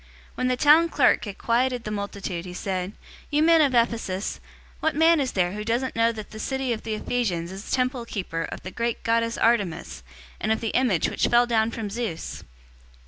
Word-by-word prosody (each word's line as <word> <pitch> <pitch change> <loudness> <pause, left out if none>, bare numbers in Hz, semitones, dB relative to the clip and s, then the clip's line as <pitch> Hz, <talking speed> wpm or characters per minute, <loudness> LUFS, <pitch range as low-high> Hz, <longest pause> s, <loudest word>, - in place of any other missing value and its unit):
019:035 - - -27
When 255 - 0
the 255 0 +1
town 315 +4 +6
clerk 275 -6 +3
had 200 -2 -7
quieted 245 +1 +1
the 215 - -5
multitude, 200 -4 -4
he 180 -1 -8
said, 185 0 -3 0.4
"You 295 +1 +2
men 330 0 +6
of 275 -4 +3
Ephesus, 225 -5 0 0.4
what 315 - 0
man 325 +1 +5
is 265 -3 -1
there 180 -2 +1
who 210 +2 -5
doesn't 240 +4 -1
know 230 0 +3
that 215 -2 -8
the 215 - -8
city 265 +1 -1
of 220 - -5
the 220 -1 -3
Ephesians 185 -8 -2
is 195 +2 -8
temple 255 -1 0
keeper 180 -7 -4
of - - -8
the 185 - -6
great 235 +3 -2
goddess 230 0 +1
Artemis, 180 - 0 0.4
and 215 - -1
of 220 - +1
the 225 - -2
image 230 -10 +2
which - - 0
fell 240 0 +5
down 225 -2 +2
from 225 -3 -5
Zeus? 220 -7 -4
230 Hz, 205 wpm, -25 LUFS, 200-250 Hz, 0.4 s, town